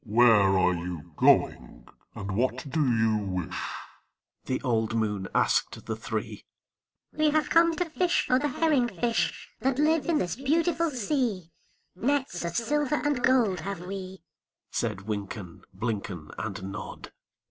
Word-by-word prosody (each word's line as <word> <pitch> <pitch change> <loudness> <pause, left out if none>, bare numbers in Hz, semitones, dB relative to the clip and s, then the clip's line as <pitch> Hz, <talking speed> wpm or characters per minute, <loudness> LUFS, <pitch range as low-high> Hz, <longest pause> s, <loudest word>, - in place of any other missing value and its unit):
"Where 105 -4 +5
are 90 0 +3
you 85 -3 -6
going, - - +2 0.3
and 100 0 -5
what 130 +4 0
do 155 +3 0
you 110 -4 +2
wish?" 95 -4 -3 0.8
The 130 - -1
old 115 -3 0
moon 105 -4 -1
asked - - +1
the - - -3
three. - - -5 0.7
"We 310 0 +3
have 310 0 +1
come 335 0 +5
to 355 - 0
fish 345 +2 +1
for 255 - +3
the 295 - 0
herring 285 -3 +2
fish 230 +3 -1
That 265 0 0
live 310 +2 +2
in 335 -2 +3
this 175 - -1
beautiful 330 +5 +1
sea; 235 - -1 0.4
Nets 260 -4 -1
of 170 0 -3
silver 295 +5 +1
and 285 -4 0
gold 230 -9 +3
have 190 +1 -5
we," 190 -1 -7 0.5
Said 95 - -2
Wynken, 100 -3 -6
Blynken, 95 -5 -4
And 100 -2 -5
Nod. 105 +2 -8
175 Hz, 145 wpm, -27 LUFS, -, 0.8 s, Where